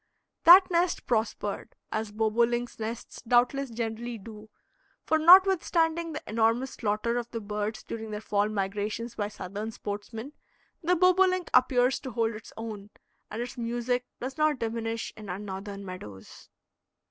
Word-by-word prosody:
That 365 +3 +9
nest 345 0 +1
prospered, 220 -3 -2 0.2
as 215 -1 -2
bobolinks' 235 +3 0
nests 225 +2 -6
doubtless 250 +3 +2
generally 230 +1 -4
do; 215 +1 -11 0.6
for, 315 - +2
notwithstanding 340 -2 +5
the 300 - -6
enormous 230 +4 +1
slaughter 220 +2 -1
of 240 0 -7
the 230 - -4
birds 210 +1 -4
during 225 -1 -6
their 210 0 -4
fall 210 -1 0
migrations 210 +3 -3
by 205 -3 -2
Southern 205 +1 -6
sportsmen, 220 +5 -6 0.5
the 355 +2 +2
bobolink 365 0 +3
appears 255 0 +4
to 260 - -7
hold 230 -1 0
its 215 - -10
own, 215 -3 -7 0.4
and 225 +3 -3
its 245 0 -8
music 240 +1 -1
does 265 +4 -6
not 305 -2 +3
diminish 230 -1 -3
in 210 -2 -10
our 180 - -3
Northern 200 0 -7
meadows. 105 - -10
230 Hz, 145 wpm, -28 LUFS, 210-255 Hz, 0.6 s, That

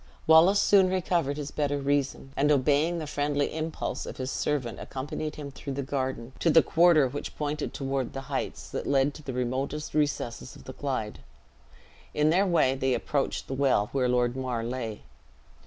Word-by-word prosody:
Wallace 165 +6 +6
soon 195 -3 +5
recovered 175 -6 0
his 145 -1 -5
better 145 -1 -1
reason, 140 -1 -1
and 145 +2 +2
obeying 145 +5 +2
the 160 - -4
friendly 145 -1 -1
impulse 160 0 -3
of - - -7
his 130 0 -3
servant, 130 -6 -2
accompanied 150 +3 -5
him 145 -2 -7
through 140 +1 -6
the 140 +1 -3
garden, 130 -2 -3
to 170 - +2
the 165 0 +6
quarter 165 -4 +5
which 145 +3 -6
pointed 150 0 -2
toward 135 -2 -3
the 135 - -4
heights 135 - -4
that - - -4
led 140 +1 +2
to 155 - -11
the 140 - -5
remotest 130 +4 -3
recesses 145 -5 -1
of - - -14
the 130 - -8
Clyde. 130 -8 -3 1.0
In 150 +1 +3
their 190 +4 +3
way 160 -7 +3
they 130 -1 0
approached 140 -2 -1
the - - -5
well 130 -6 +2
where 130 -2 +1
Lord 125 0 +1
Mar 125 -3 -2
lay. 115 -3 -4
140 Hz, 180 wpm, -28 LUFS, 130-150 Hz, 1.0 s, Wallace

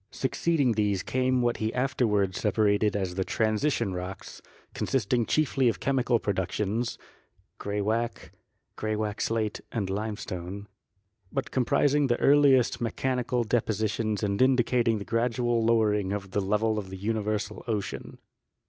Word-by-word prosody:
Succeeding 140 0 0
these 105 -3 0
came 130 -1 +1
what 120 0 +1
he 110 0 -1
afterward 110 -7 +1
separated 105 -1 +2
as 95 -3 -1
the 95 +1 -1
Transition 110 +1 0
Rocks, 90 +1 -7 0.3
consisting 120 -2 0
chiefly 135 -4 +2
of 100 -6 -3
chemical 125 -2 +1
productions 105 +3 -2 0.6
(gray 105 0 -2
wacke, 115 +3 -2 0.4
graywacke 110 -1 -2
slate 110 -2 -1
and 100 -5 -2
limestone), 100 -2 -5 0.6
but 135 - -3
comprising 140 +2 +2
the 120 -1 +1
earliest 135 -4 +4
mechanical 125 +1 -1
depositions 110 -1 -1
and 100 +1 0
indicating 125 -3 +3
the 100 - -6
gradual 120 0 0
lowering 105 -4 +2
of 95 -2 -5
the 100 - 0
level 105 +2 +1
of 95 -2 -7
the 95 - -7
universal 105 +1 -2
ocean. 105 -4 -4
110 Hz, 130 wpm, -27 LUFS, 105-125 Hz, 0.6 s, earliest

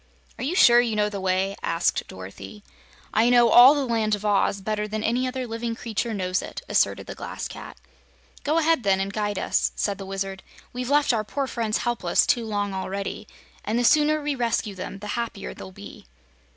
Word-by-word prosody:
"Are - - -4
you 305 +7 -1
sure 240 -9 +7
you 230 -3 -1
know 210 0 +1
the 200 -2 -5
way?" 190 +1 0
asked 165 +1 0
Dorothy. 95 +2 -10 0.5
"I 225 +2 +4
know 240 -1 +5
all 255 +4 +9
the 285 -2 0
Land 220 -3 +1
of 205 +1 -9
Oz 200 -1 +2
better 210 +1 -2
than 215 0 -4
any 245 +3 0
other 255 0 -3
living 230 0 -4
creature 230 0 -3
knows 185 -3 -1
it," - - -8
asserted - - +1
the - - -7
Glass - - -6
Cat. - - -10 0.7
"Go 305 +3 +1
ahead, 325 -3 +3
then, 195 -3 +2
and 195 +1 -3
guide 205 -2 -2
us," - - 0
said 200 -1 -2
the 195 - -6
Wizard. 195 0 -4 0.3
"We've 250 0 -4
left 290 -2 +3
our 220 -2 0
poor 275 +6 -3
friends 225 -4 -1
helpless 235 -8 +1
too 235 -2 +1
long 205 -2 -2
already, 195 +2 -4 0.4
and 220 +2 -1
the 245 - +1
sooner 305 +4 +4
we 295 0 0
rescue 230 -4 -1
them 190 +1 -7
the 210 +1 -8
happier 230 - -4
they'll 95 +7 -10
be." 100 -7 -12
215 Hz, 205 wpm, -24 LUFS, 195-240 Hz, 0.7 s, all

